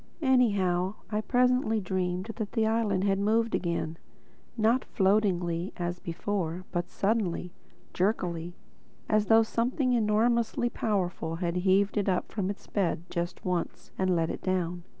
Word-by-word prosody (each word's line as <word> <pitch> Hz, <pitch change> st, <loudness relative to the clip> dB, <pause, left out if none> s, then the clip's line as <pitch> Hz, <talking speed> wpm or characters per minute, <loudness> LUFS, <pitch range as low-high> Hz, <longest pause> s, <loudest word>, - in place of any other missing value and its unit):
Anyhow 200 Hz, -8 st, +2 dB, 0.2 s
I 210 Hz, 0 st, 0 dB
presently 250 Hz, -2 st, +2 dB
dreamed 185 Hz, +1 st, -2 dB
that 215 Hz, -3 st, -4 dB
the 225 Hz, -2 st, +2 dB
island 220 Hz, -4 st, +1 dB
had 195 Hz, -1 st, +2 dB
moved 225 Hz, +3 st, +2 dB
again—not 190 Hz, +7 st, -2 dB
floatingly 190 Hz, -4 st, +1 dB
as 175 Hz, 0 st, -3 dB
before, 175 Hz, 0 st, -3 dB
but 175 Hz, 0 st, -2 dB
suddenly, 195 Hz, -4 st, -1 dB, 0.4 s
jerkily, 175 Hz, -3 st, -1 dB, 0.5 s
as 215 Hz, -1 st, +2 dB
though 225 Hz, 0 st, +6 dB
something 250 Hz, +3 st, 0 dB
enormously 235 Hz, +1 st, +2 dB
powerful 180 Hz, -6 st, -1 dB
had 170 Hz, 0 st, -2 dB
heaved 195 Hz, +3 st, +2 dB
it 205 Hz, -1 st, +1 dB
up 180 Hz, -, -1 dB
from 195 Hz, -3 st, -2 dB
its 200 Hz, -, -6 dB
bed 175 Hz, -5 st, -1 dB
just 170 Hz, +1 st, -3 dB
once 180 Hz, -2 st, -3 dB
and 185 Hz, -1 st, +1 dB
let 165 Hz, -1 st, +1 dB
it -, -, -6 dB
down. 180 Hz, -2 st, -1 dB
195 Hz, 135 wpm, -29 LUFS, 175-220 Hz, 0.5 s, though